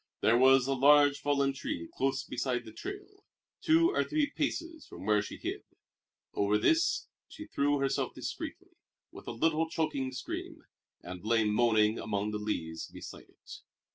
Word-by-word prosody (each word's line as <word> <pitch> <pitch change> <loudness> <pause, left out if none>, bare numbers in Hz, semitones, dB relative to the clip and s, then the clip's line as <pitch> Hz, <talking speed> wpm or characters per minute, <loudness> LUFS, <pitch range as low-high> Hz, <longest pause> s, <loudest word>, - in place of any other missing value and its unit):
There 115 - +4
was 130 +1 +6
a 135 - 0
large 145 +1 +5
fallen 140 -1 +1
tree 85 -10 -5
close 135 0 -1
beside 125 -1 -2
the 110 - -10
trail, 400 +1 -9 0.4
two 330 +2 +4
or - - +1
three 300 -2 0
paces 320 +2 -3
from - - -10
where 105 0 +3
she 105 - -7
hid. - - -4 0.7
Over 100 +1 +2
this 330 - +2 0.2
she 310 - -10
threw 145 - +1
herself 135 -1 -1
discreetly, - - -6 0.4
with - - -12
a - - -3
little 160 +6 +1
choking 140 -5 -2
scream, 130 0 -6 0.4
and 90 +1 -8
lay 115 +1 +2
moaning 110 0 +3
among 105 0 -2
the 105 - -3
leaves 80 -6 -4
beside - - -11
it. - - -13
135 Hz, 160 wpm, -31 LUFS, 110-160 Hz, 0.7 s, was